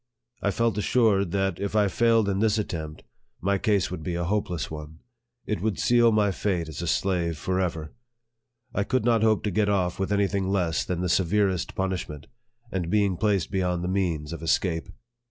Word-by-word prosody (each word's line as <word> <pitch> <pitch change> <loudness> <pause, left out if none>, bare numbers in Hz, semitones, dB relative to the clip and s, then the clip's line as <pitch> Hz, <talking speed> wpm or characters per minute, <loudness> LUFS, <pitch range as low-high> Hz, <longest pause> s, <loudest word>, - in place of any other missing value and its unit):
I - - +1
felt 110 +1 0
assured 105 -4 +2
that, 95 -2 0
if 100 +1 -3
I 105 -1 +4
failed 115 +1 +3
in 100 -1 0
this 110 0 +2
attempt, 80 -7 -4 0.4
my 100 +2 0
case 100 -6 +1
would 90 - -5
be 85 +2 -3
a 85 - -1
hopeless 90 -4 -2
one 75 0 -8 0.5
it 105 - -2
would 110 -1 -1
seal 120 -1 +4
my 105 -2 +3
fate 90 -4 -1
as 80 0 -6
a 85 - -3
slave 85 -3 0
forever. 85 -3 -2 0.8
I 100 - +1
could 120 +3 0
not 115 -2 +3
hope 110 -1 +3
to 105 - -1
get 105 +2 +1
off 90 -3 0
with 95 +1 -1
any 100 0 +3
thing 95 -1 -1
less 90 -5 +1
than 90 -1 -3
the 90 - 0
severest 95 0 +1
punishment, 90 -6 -3 0.5
and 90 -3 -2
being 100 -1 +2
placed 100 -1 0
beyond 90 -3 0
the 90 - -2
means 85 -5 -1
of 85 - -7
escape. 80 +1 0
95 Hz, 190 wpm, -26 LUFS, 85-105 Hz, 0.8 s, I